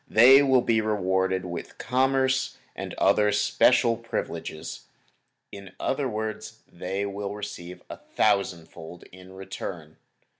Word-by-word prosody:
They 130 +5 +8
will 130 -3 +3
be 110 -1 +2
rewarded 95 -3 0
with 85 -1 -7
commerce 130 +1 +1 0.2
and - - -6
other 105 0 +3
special 115 +3 +3
privileges. 85 -8 -6 0.7
In 100 -2 -11
other 135 0 -1
words 110 0 -5
they 95 +3 -4
will 100 0 -5
receive 90 -4 -8
a - - -8
thousand 90 -4 0
fold 85 +2 -11
in 95 +1 -14
return. 90 -4 -8
105 Hz, 120 wpm, -26 LUFS, 95-115 Hz, 0.7 s, They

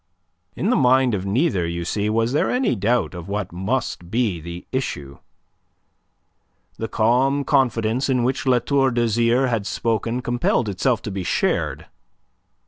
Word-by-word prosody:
In 205 - 0
the - - +3
mind 130 -1 +4
of 95 -1 -2
neither, 100 - +1
you 85 0 -4
see, 105 +4 -1
was 115 +3 +1
there 150 - +1
any 250 - +1
doubt 115 +3 0
of 85 -2 -8
what 100 -2 -3
must 95 -1 -3
be 110 -5 0
the 85 +2 -8
issue. 70 - -4 1.6
The 110 - -2
calm 130 +6 +2
confidence 125 -2 +1
in 125 -2 +2
which 135 +2 -1
La 125 -1 +5
Tour 135 +2 +2
d'Azyr 120 +1 +2
had 115 -4 -1
spoken 115 +3 -1
compelled 120 -1 0
itself 115 +4 0
to 105 - -4
be 95 -1 -4
shared. - - -1
115 Hz, 150 wpm, -22 LUFS, 100-130 Hz, 1.6 s, La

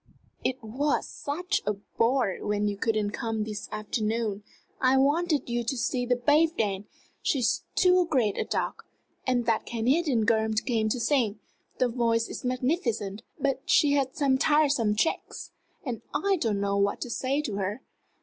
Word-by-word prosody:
"It 260 -1 -2
was 270 +7 0
such 340 +6 -2
a 210 - 0
bore 230 +3 0
you 205 +1 -1
couldn't 210 0 0
come 225 -1 -2
this 210 -1 -6
afternoon! 215 0 -2 0.4
I 260 0 +4
wanted 295 +2 +2
you 240 0 -1
to 265 +3 -1
see 245 +1 -1
the 245 - +3
babe 300 +7 +3
dance 205 -1 -1 0.3
she's 255 -6 +1
too 360 -1 +4
great 240 - +1
a - - -1
duck! - - -3 0.4
And 245 -2 +1
that 225 -1 0
Canadian 245 +1 +1
girl 220 0 +2 0.2
came 220 -4 +1
to 245 - -1
sing. 230 -5 +1 0.4
The 255 - +3
voice 230 -1 +1
is - - -7
magnificent 250 - -1 0.2
but 275 -1 0
she 290 - +5
has 280 -2 +2
some 270 -4 +2
tiresome 285 -8 +3
tricks! 220 - -2 0.3
and 240 -5 -4
I 395 0 +2
didn't 215 - 0
know 200 0 0
what 200 0 +1
to 245 - -4
say 275 +5 0
to 210 -8 -3
her. 205 +6 -3
240 Hz, 160 wpm, -27 LUFS, 215-275 Hz, 0.4 s, she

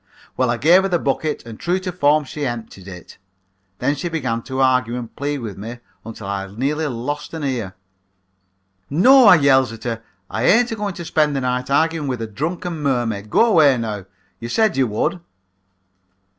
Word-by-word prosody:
"Well, 130 -2 +1
I 120 - 0
gave 170 +9 +5
her 195 - 0
the 175 - +2
bucket 150 -1 -2
and 115 -2 -10
true 175 +2 0
to 185 -1 -4
form 150 -3 +2
she 145 +2 -6
emptied 115 -7 -5
it. 90 -3 -11 0.6
Then 130 +6 0
she 175 +5 -4
began 125 -8 -2
to 130 +2 -5
argue 125 -2 +2
and 120 -2 -8
plead 145 -1 -3
with 105 -4 -7
me 115 +4 -7 0.3
until 110 -2 -9
I 100 0 -3
nearly 140 +10 -2
lost 145 +5 -5
an 160 - -5
ear. 120 -9 -3 1.1
"'No,' 250 - +6
I 190 - +9
yells 135 -5 +3
at 115 -1 -10
her, 115 -2 -3 0.3
'I - - -2
ain't 235 +2 +4
agoing 205 -4 -3
to 170 - -7
spend 150 -3 +1
the 135 - -1
night 125 0 -2
arguing 160 +1 +1
with 125 -3 -2
a 115 - -3
drunken 160 - -4
mermaid. 120 -7 -1
Go 230 - +4
away, 155 - +5
now; 105 -4 -4 0.3
you 115 - -6
said 220 - +2
you 135 -2 +2
would.' 110 - -1
135 Hz, 190 wpm, -20 LUFS, 115-160 Hz, 1.1 s, I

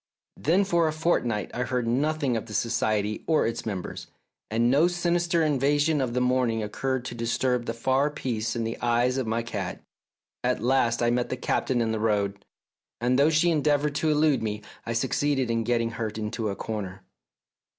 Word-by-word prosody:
Then 175 +6 +2
for 170 -3 +2
a - - +1
fortnight 125 - 0
I 125 - -2
heard 125 -1 -1
nothing 140 +1 +1
of 110 - -3
the 105 - -7
Society 110 -2 0
or 160 -2 +3
its 115 0 -3
members, 95 -4 -5 0.4
and 115 +2 +2
no 150 +6 +5
sinister 175 -1 +1
invasion 145 +1 +2
of 125 -2 -2
the - - +2
morning 125 -3 +1
occurred 130 +4 -2
to - - -5
disturb 120 +1 -1
the 115 - -1
far 130 +4 +1
peace 120 -7 -3
in 115 - -1
the 115 +1 -4
eyes 120 +2 +2
of 130 - -2
my 115 +1 0
cat. 115 - -5 0.6
At - - +1
last 120 -2 +2
I 120 - +3
met 120 0 0
the 130 - -3
Captain 125 0 0
in 115 -1 0
the 110 - -1
road, 100 -2 0 0.6
and 125 +3 +2
though 145 +2 +5
she 160 +2 +3
endeavoured 150 -1 +2
to 155 +1 +1
elude 150 -2 +3
me, 105 -1 -3 0.2
I 115 - -1
succeeded 130 +1 0
in 115 0 0
getting 115 0 0
her 110 -1 -3
into 110 +1 -3
a 100 - -3
corner. 100 -4 -5
120 Hz, 190 wpm, -26 LUFS, 115-145 Hz, 0.6 s, no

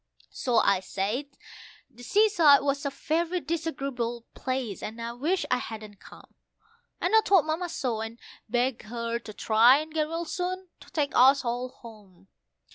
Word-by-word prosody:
So 250 -5 -2
I 200 -3 +4
said 200 +9 -3 0.6
the 245 - -17
seaside 340 - +5
was 280 0 0
a - - 0
very 330 +5 -1
disagreeable 275 -7 -3
place, 255 -6 -3
and 220 +2 -6
I 230 0 -4
wished 330 +9 -1
I - - +4
hadn't 215 -3 -8
come, - - -16 0.7
And - - +1
I 445 - +7
told 385 -7 +4
Mamma 325 +3 -2
so, 245 -8 -2
and 225 +1 -6 0.3
begged 245 +1 0
her 230 +1 -4
to 230 - -10
try 225 +5 +5
and 310 +1 -5
get 310 -1 0
well 330 +2 -3
soon, 365 +2 -4
to - - -16
take 295 -3 -1
us 270 +1 +5
all 245 +2 -2
home. 205 -7 -16
260 Hz, 165 wpm, -27 LUFS, 230-315 Hz, 0.7 s, I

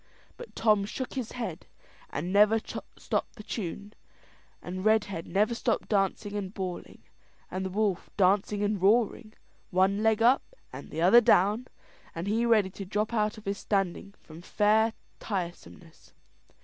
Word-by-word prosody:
But 485 - -12
Tom 215 -3 +3
shook 255 +5 -5
his 255 -4 -4
head, 205 -9 -5 0.4
and 175 +6 -4
never 210 +2 +5
stopped 220 - -5
the 215 - -10
tune, 205 0 -5 0.7
and 185 +1 -6
Redhead 205 -6 +1
never 210 +4 +1
stopped 235 0 -1
dancing 205 0 0
and 195 -2 -3
bawling, 185 -3 -6 0.5
and 185 +1 -3
the 190 - -3
wolf 200 -1 -1
dancing 200 +1 +2
and 205 -2 -1
roaring, 215 +1 +2 0.3
one 190 +2 +2
leg 220 0 +2
up 260 - +3 0.2
and - - -9
the 160 +2 -3
other 235 +7 +7
down, 210 +4 +3 0.5
and 165 +2 -4
he 225 +4 +1
ready 215 -5 +3
to 200 - -7
drop 210 +4 -2
out 215 -1 0
of 215 - -13
his 200 0 -2
standing 200 0 -2
from 160 +1 -13
fair 215 +4 +2 0.3
tiresomeness. 175 -3 -7
205 Hz, 150 wpm, -28 LUFS, 190-220 Hz, 0.7 s, other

